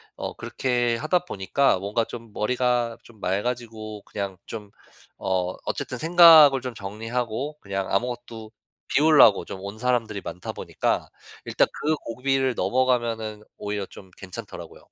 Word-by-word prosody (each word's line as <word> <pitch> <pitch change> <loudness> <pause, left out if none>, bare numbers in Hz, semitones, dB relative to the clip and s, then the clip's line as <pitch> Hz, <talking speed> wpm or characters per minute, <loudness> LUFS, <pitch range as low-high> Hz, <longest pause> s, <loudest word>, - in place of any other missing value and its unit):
어 - - -5
그렇게 120 -2 0
하다 175 +6 0
보니까 100 - +1
뭔가 105 +4 0
좀 115 -2 -9
머리가 120 0 0
좀 115 -3 -18
맑아지고 110 +1 -3
그냥 100 -2 -5
좀 105 -3 -8 0.5
어 95 -1 0
어쨌든 - - -3
생각을 160 -5 +8
좀 125 -1 -5
정리하고 115 +7 -4
그냥 95 -1 -3
아무것도 115 0 -3 0.4
비우려고 150 -9 +6
좀 95 - -7
온 100 +2 -7
사람들이 120 -5 0
많다 90 - -6
보니까 - - -2 0.4
일단 - - +2
그 155 +1 +2
고비를 130 +1 -1
넘어가면은 115 -1 0
오히려 105 -1 -3
좀 95 - -14
괜찮더라고요. 95 -2 -9
115 Hz, 310 characters per minute, -25 LUFS, 100-125 Hz, 0.5 s, 생각을